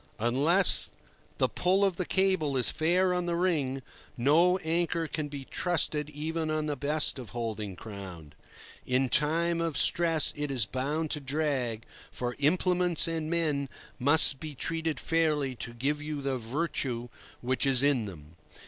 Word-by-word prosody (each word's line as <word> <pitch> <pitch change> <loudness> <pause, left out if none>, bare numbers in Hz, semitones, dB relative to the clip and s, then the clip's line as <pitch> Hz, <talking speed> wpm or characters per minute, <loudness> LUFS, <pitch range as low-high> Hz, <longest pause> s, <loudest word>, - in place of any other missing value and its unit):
Unless 145 - +3 0.5
the - - +3
pull 190 +3 +2
of 190 -3 0
the 180 - -3
cable 185 -8 +1
is 125 -4 +3
fair 180 +3 +2
on 180 -1 -1
the 170 - 0
ring, 145 -7 0 0.3
no 165 +9 +4
anchor 170 -1 -1
can 155 -1 -3
be 140 -2 -8
trusted 150 -3 -1
even 155 +2 -3
on 155 0 -1
the 150 -1 -2
best 145 +1 +1
of 125 - -8
holding 110 -4 -4
ground. 90 -7 -9 0.5
In 130 +1 +1
time 165 +5 +2
of 165 -5 -1
stress 165 -3 +2
it 150 0 -2
is 130 -5 0
bound 145 +7 -2
to 150 - -2
drag, 135 -5 -1 0.3
for 125 -1 -4
implements 180 +3 +3
and 160 -2 -2
men 150 -5 0 0.3
must 140 0 +5
be 155 -2 -7
treated 165 +1 -2
fairly 155 -5 +1
to 115 - -5
give 140 +5 -2
you 150 -1 -5
the 135 -2 -1
"virtue" 120 -1 -3 0.3
which 130 +2 0
is 135 -1 +2
in 140 -6 +2
them. 80 -4 -11
150 Hz, 155 wpm, -29 LUFS, 130-165 Hz, 0.5 s, must